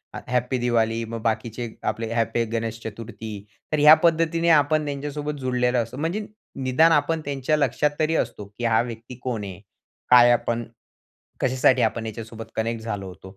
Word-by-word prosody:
ह - - -4
हॅपी 125 +1 0
दिवाली, 115 -1 +1
मग 115 0 -6
बाकीचे 115 +1 -2 0.2
आपले 115 0 -3
ह - - -5
हॅपी 115 +1 +1
गणेश 115 0 -2
चतुर्थी. 110 0 -7 0.4
तर 155 - +1
ह्या 150 +1 +9
पद्धतीने 165 0 +2
आपण 155 0 +4
त्यांच्यासोबत 145 +1 -4
जुडलेलो 125 -1 0
असतो, 115 +3 -10
म्हणजे 170 +8 -2 0.4
निदान 155 +6 +4
आपण 160 +1 +2
त्यांच्या 140 +2 0
लक्षात 150 0 +1
तरी 160 +1 +1
असतो, 105 - -2
की 120 - -3
हा 110 -1 +3
व्यक्ती 120 +1 -7
कोण 120 -5 -3
आहे, 95 -2 -7 0.5
काय 120 -1 +8
आपण, 120 -1 0 0.8
कशासाठी 130 0 +3
आपण 115 -1 0
याच्यासोबत 115 +1 -7
कनेक्ट 115 0 -2
झालो 105 -3 -4
होतो, 95 +2 -12
120 Hz, 165 wpm, -24 LUFS, 115-145 Hz, 0.8 s, ह्या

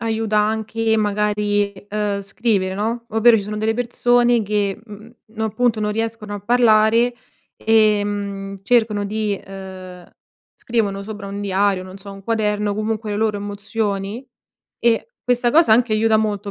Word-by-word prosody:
aiuta 220 -1 0
anche 220 +1 0
magari, 205 -1 0 0.2
uhm, 205 -1 -1
scrivere 195 -3 -1
no, 230 +3 -3
ovvero 225 +1 +5
ci 205 - -1
sono 210 +1 -5
delle 220 +1 0
persone 245 0 +2
che, 205 -1 -1
mhmm, 215 +1 -12 0.2
no 220 0 -5
appunto 220 +1 0
non 210 0 0
riescono 225 -1 -4
a 205 - -6
parlare 230 +1 +4 0.4
ehm, 205 -2 +1
cercano 220 -2 +2
di, 210 -1 -2
uhm 185 -2 -10 0.6
scrivono 205 -4 0
sopra 205 -1 -7
un 200 +1 -5
diario, 195 -1 +1
non 185 +1 -10
so, 200 0 -10
un 195 0 -12
quaderno, 210 -2 0
comunque 215 0 -2
le 205 - -2
loro 215 -1 0
emozioni 205 +2 -3 0.6
e 235 - +1 0.2
questa 245 -1 +2
cosa 305 -5 +5
anche 230 -1 +3
aiuta 220 0 +3
molto, 205 -1 -2
210 Hz, 150 wpm, -20 LUFS, 200-225 Hz, 0.6 s, ovvero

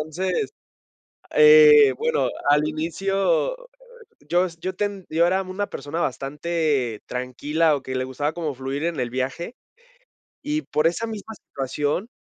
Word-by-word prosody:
Entonces, 185 - -2 0.8
eh, 455 -2 +8
bueno, 470 +1 0 0.2
al 150 +1 +4
inicio, 195 - 0
eh, - - -16 0.6
yo 180 +2 +3
es 170 -1 -11
Yo 185 +3 -4
ten- 200 -1 -3
Yo 165 +2 +3
era 190 +1 +1
una 190 +2 -4
persona 145 +5 -5
bastante 145 -4 -1
tranquila 145 +5 0
o 140 - -7
que 130 - -6
le 130 0 -1
gustaba 145 +4 -2
como 160 -3 -3
fluir 135 +3 -4
en 170 -2 -2
el 125 -2 -2
viaje, 130 - -4 0.9
y 300 +1 -2
por 155 - +1
esa 170 +7 -1
misma 220 -1 -7
situación, 145 - -3
165 Hz, 145 wpm, -23 LUFS, 145-200 Hz, 0.9 s, eh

